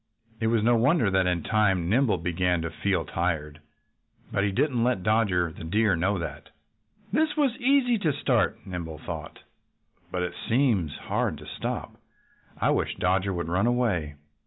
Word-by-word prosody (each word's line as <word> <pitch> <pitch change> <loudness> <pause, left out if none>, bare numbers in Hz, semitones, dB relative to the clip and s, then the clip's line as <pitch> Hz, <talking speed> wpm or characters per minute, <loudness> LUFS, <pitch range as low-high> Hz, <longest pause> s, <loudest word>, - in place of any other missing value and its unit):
It 110 - 0
was 115 -1 +2
no 120 +1 +4
wonder 120 - +3
that 95 -1 +2
in 90 -3 0
time 95 -5 +2
Nimble 115 0 +2
began 90 0 0
to 85 - -3
feel 90 -1 -1
tired. 80 -3 -2 0.7
But 100 - +1
he 100 - +1
didn't 120 +3 +1
let 120 -7 +1
Dodger 100 -6 +2
the 80 - -10
Deer 105 +4 +2
know 95 +4 0
that. 85 - -6 0.6
"This 310 +3 +1
was 275 -6 +2
easy 255 -3 +3
to 160 -6 +1
start," 130 -4 0
Nimble 85 -4 -6
thought, 80 0 -8 0.7
"but 90 -1 -1
it 90 - -3 0.2
seems 115 - +2
hard - - -1
to - - -12
stop. - - -5 0.6
I - - +2
wish - - 0
Dodger 95 +1 +1
would 85 -3 -3
run 90 +6 +1
away." 105 -12 0
95 Hz, 165 wpm, -26 LUFS, 85-120 Hz, 0.7 s, no